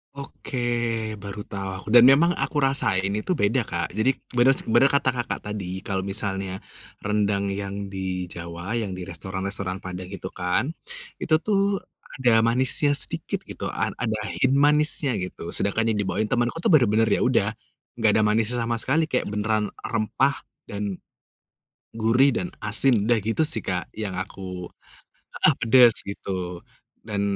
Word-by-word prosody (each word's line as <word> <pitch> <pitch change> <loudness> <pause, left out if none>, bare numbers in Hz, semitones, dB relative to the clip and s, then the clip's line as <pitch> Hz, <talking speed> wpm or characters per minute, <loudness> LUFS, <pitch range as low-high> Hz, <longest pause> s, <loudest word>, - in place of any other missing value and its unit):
Oke, 140 -2 -6 0.6
baru 100 +1 -6
tah 95 -1 -6
dan 120 +2 +7
memang 170 +5 +4
aku 140 +2 -1
rasain 100 -8 +1
itu 105 +12 -2
beda, 115 - +2
Kak, 85 +1 -4
jadi 110 +5 +3 0.2
beners 130 +2 +4
bener 120 +5 +5
kata, 140 -2 +2
Kakak, 120 -1 -2
tadi 95 -3 -5
kalau 95 -1 -1
misalnya, 95 -1 -3 0.4
rendang 105 -1 0
yang 100 0 -4
di 95 -2 -4
Jawa 85 +4 -5
yang 110 -4 -2
di 90 -1 -6
restoran-restoran 95 +2 -4
padang 90 -1 -7
gitu 95 -2 -6
kan, 90 +8 -1 0.6
itu 160 - 0
tuh 200 +1 +1 0.4
ada 115 -3 +4
manisnya 130 +5 +2
sedikit 145 - -3
gitu - - -5
a - - -1
ada 110 -3 -1 0.2
hint 130 - +2
manisnya 145 -3 +2
gitu. 90 -2 -4
Sedangkan 110 +3 +1
yang - - -1
dibawain 105 +3 -1
temenku 120 +8 0
tuh - - 0
bener-bener 115 -5 +4
ya - - +2
udah, - - +2 0.4
enggak 110 -3 +3
ada 110 - +3
manisnya 115 +3 +1
sama 115 0 0
sekali 150 +7 +1
kayak 105 - -1
beneran 105 0 0
rempah 115 +5 0 0.2
dan, 100 -2 -4 1.0
gurih 120 +4 +3
dan 180 - -2
asin 105 +1 +1
udah 120 -1 +4
gitu 115 +9 +1
sih, 110 -7 -2
Kak, 90 -1 -2
yang 100 -4 -4
aku 95 -1 -6 0.7
heeh, - - +5
pedes 120 0 +6
gitu 90 -3 -5 0.4
dan 105 -2 -2
105 Hz, 150 wpm, -24 LUFS, 95-125 Hz, 1.0 s, dan